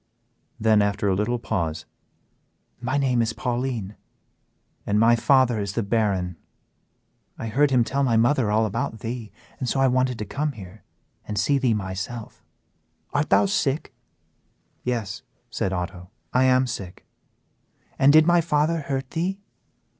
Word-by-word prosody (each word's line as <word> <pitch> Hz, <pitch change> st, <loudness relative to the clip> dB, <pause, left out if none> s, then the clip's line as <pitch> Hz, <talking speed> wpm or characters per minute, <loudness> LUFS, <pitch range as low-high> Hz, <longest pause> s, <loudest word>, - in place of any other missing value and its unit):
Then, 110 Hz, -1 st, +4 dB
after 100 Hz, 0 st, 0 dB
a 95 Hz, -, +3 dB
little 105 Hz, +5 st, 0 dB
pause 85 Hz, -9 st, -3 dB, 1.0 s
"My 130 Hz, +3 st, -1 dB
name 130 Hz, -4 st, +2 dB
is 115 Hz, 0 st, 0 dB
Pauline, 120 Hz, -5 st, -3 dB, 0.9 s
and 105 Hz, +1 st, +1 dB
my 115 Hz, +1 st, +5 dB
father 125 Hz, -2 st, +3 dB
is 100 Hz, -1 st, -3 dB
the 115 Hz, -, -1 dB
Baron. 100 Hz, -5 st, 0 dB, 1.0 s
I 115 Hz, -, -5 dB
heard 145 Hz, +6 st, +3 dB
him 125 Hz, -3 st, +3 dB
tell 135 Hz, +4 st, -1 dB
my 120 Hz, -5 st, +2 dB
mother 120 Hz, 0 st, +3 dB
all 110 Hz, +1 st, +2 dB
about 110 Hz, +1 st, -3 dB
thee, 115 Hz, -3 st, -5 dB, 0.3 s
and 130 Hz, -, -2 dB
so 135 Hz, -, 0 dB
I 135 Hz, -, +4 dB
wanted 130 Hz, -1 st, +1 dB
to 105 Hz, -, -4 dB
come 145 Hz, +8 st, -2 dB
here 100 Hz, -2 st, -12 dB, 0.4 s
and 105 Hz, -, -4 dB
see 140 Hz, +7 st, +2 dB
thee 125 Hz, -4 st, +2 dB
myself: 100 Hz, +4 st, -6 dB, 0.7 s
Art 145 Hz, +2 st, 0 dB
thou -, -, +5 dB
sick?" 160 Hz, -7 st, -1 dB, 0.9 s
"Yes," 110 Hz, -5 st, -3 dB, 0.3 s
said 100 Hz, -3 st, -1 dB
Otto, 90 Hz, 0 st, -5 dB, 0.2 s
"I 130 Hz, +1 st, +4 dB
am 130 Hz, 0 st, +4 dB
sick." 100 Hz, -7 st, -7 dB, 0.9 s
"And 135 Hz, +1 st, +6 dB
did 155 Hz, +1 st, +7 dB
my 175 Hz, 0 st, +4 dB
father 160 Hz, 0 st, +1 dB
hurt 135 Hz, -2 st, -4 dB
thee?" 185 Hz, +4 st, -2 dB
120 Hz, 150 wpm, -24 LUFS, 105-135 Hz, 1.0 s, did